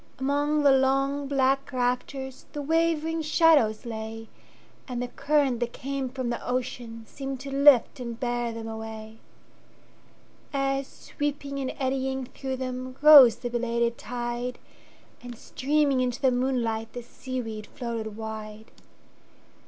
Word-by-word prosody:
Among 290 Hz, +3 st, +1 dB
the 280 Hz, -, +7 dB
long, 275 Hz, +1 st, +2 dB
black 270 Hz, 0 st, +1 dB
raftersThe 265 Hz, +2 st, -3 dB
wavering 325 Hz, 0 st, +1 dB
shadows 300 Hz, -9 st, +3 dB
lay, 225 Hz, -1 st, -6 dB, 0.6 s
And 250 Hz, -3 st, -4 dB
the 245 Hz, -, -2 dB
current 280 Hz, -3 st, +1 dB
that 240 Hz, 0 st, -2 dB
came 275 Hz, 0 st, -3 dB
from 255 Hz, -1 st, -3 dB
the 235 Hz, -, -1 dB
oceanSeemed 250 Hz, +1 st, -4 dB
to 275 Hz, 0 st, -7 dB
lift 280 Hz, -3 st, +5 dB
and 235 Hz, -2 st, -6 dB
bear 240 Hz, -1 st, -1 dB
them 225 Hz, 0 st, -6 dB
away; 220 Hz, 0 st, -7 dB, 1.3 s
As, 275 Hz, 0 st, 0 dB
sweeping 285 Hz, -1 st, -4 dB
and 260 Hz, -1 st, -2 dB
eddying 265 Hz, 0 st, -1 dB
through 265 Hz, +1 st, -5 dB
them, 255 Hz, 0 st, -5 dB
Rose 280 Hz, -7 st, +10 dB
the 245 Hz, -, -5 dB
belated 235 Hz, 0 st, 0 dB
tide, 240 Hz, +1 st, -4 dB, 0.6 s
And, 245 Hz, -1 st, -9 dB
streaming 280 Hz, +1 st, +1 dB
into 250 Hz, -1 st, -1 dB
the 265 Hz, -2 st, +3 dB
moonlight, 240 Hz, -3 st, -1 dB
The 245 Hz, -, -6 dB
seaweed 235 Hz, -4 st, -6 dB
floated 230 Hz, -5 st, -5 dB
wide. 220 Hz, -1 st, -7 dB
255 Hz, 125 wpm, -27 LUFS, 235-275 Hz, 1.3 s, Rose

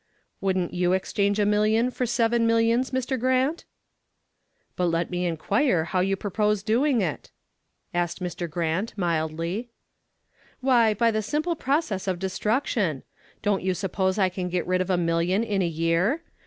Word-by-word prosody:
"Wouldn't 185 Hz, -2 st, 0 dB
you 180 Hz, 0 st, +1 dB
exchange 200 Hz, +2 st, 0 dB
a 210 Hz, -, +2 dB
million 215 Hz, +4 st, +2 dB
for 250 Hz, 0 st, -2 dB
seven 235 Hz, 0 st, +2 dB
millions, 230 Hz, +3 st, +2 dB
Mr. 260 Hz, 0 st, -2 dB
Grant?" 260 Hz, +6 st, +1 dB, 1.1 s
"But 180 Hz, -, 0 dB
let 170 Hz, +1 st, -1 dB
me 180 Hz, 0 st, -1 dB
inquire 175 Hz, -, +1 dB
how 185 Hz, +3 st, -1 dB
you 195 Hz, +2 st, +1 dB
purpose 210 Hz, 0 st, 0 dB
doing 240 Hz, +3 st, +2 dB
it?" 165 Hz, -6 st, -3 dB, 0.6 s
asked 175 Hz, 0 st, -1 dB
Mr. 175 Hz, -1 st, -4 dB
Grant, 170 Hz, +7 st, -2 dB
mildly. 170 Hz, +5 st, -2 dB, 0.9 s
"Why, 240 Hz, -5 st, +3 dB
by 230 Hz, +2 st, +3 dB
the 215 Hz, 0 st, 0 dB
simple 305 Hz, -, -1 dB
process 270 Hz, -, -1 dB
of 185 Hz, -2 st, 0 dB
destruction. 190 Hz, -, -1 dB, 0.4 s
Don't 205 Hz, -1 st, +1 dB
you 185 Hz, 0 st, 0 dB
suppose 190 Hz, +1 st, -1 dB
I 190 Hz, -2 st, +3 dB
can 180 Hz, 0 st, -4 dB
get 180 Hz, -1 st, -1 dB
rid 185 Hz, 0 st, +1 dB
of 185 Hz, -, -3 dB
a 185 Hz, -, +2 dB
million 170 Hz, +4 st, +1 dB
in 205 Hz, -4 st, 0 dB
a 175 Hz, -, +1 dB
year? 165 Hz, -, 0 dB
195 Hz, 155 wpm, -25 LUFS, 175-230 Hz, 1.1 s, Why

